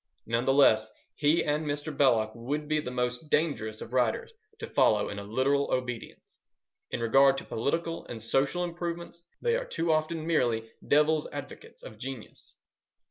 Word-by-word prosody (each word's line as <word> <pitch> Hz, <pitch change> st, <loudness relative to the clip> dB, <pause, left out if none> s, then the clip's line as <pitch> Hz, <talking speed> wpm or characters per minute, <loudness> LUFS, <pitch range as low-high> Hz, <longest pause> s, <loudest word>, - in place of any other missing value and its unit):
None 115 Hz, +2 st, 0 dB
the 135 Hz, -, +3 dB
less, 110 Hz, -6 st, +5 dB, 0.2 s
he 150 Hz, +3 st, +2 dB
and 150 Hz, +1 st, 0 dB
Mr. 145 Hz, 0 st, -3 dB
Belloc 115 Hz, -6 st, +3 dB
would 145 Hz, +6 st, -4 dB
be 155 Hz, 0 st, +1 dB
the 150 Hz, -, -4 dB
most 125 Hz, +4 st, -2 dB
dangerous 110 Hz, -10 st, 0 dB
of 120 Hz, -, -8 dB
writers 125 Hz, -, 0 dB, 0.2 s
to -, -, -5 dB
follow -, -, +2 dB
in 100 Hz, -, -5 dB
a -, -, -6 dB
literal 130 Hz, +7 st, +1 dB
obedience. 125 Hz, -2 st, -4 dB, 0.5 s
In -, -, -3 dB
regard 135 Hz, +4 st, +5 dB
to -, -, -5 dB
political 165 Hz, +8 st, -2 dB
and 115 Hz, -, -6 dB
social 135 Hz, +9 st, +1 dB
improvements, 170 Hz, 0 st, -5 dB, 0.2 s
they 475 Hz, -1 st, +2 dB
are -, -, -2 dB
too 165 Hz, -, -1 dB
often 155 Hz, +1 st, 0 dB
merely 120 Hz, -8 st, +1 dB, 0.2 s
Devil's 150 Hz, +1 st, +3 dB
Advocates -, -, -9 dB
of 110 Hz, -, -11 dB
genius. 130 Hz, -3 st, -9 dB
140 Hz, 165 wpm, -29 LUFS, 120-155 Hz, 0.5 s, less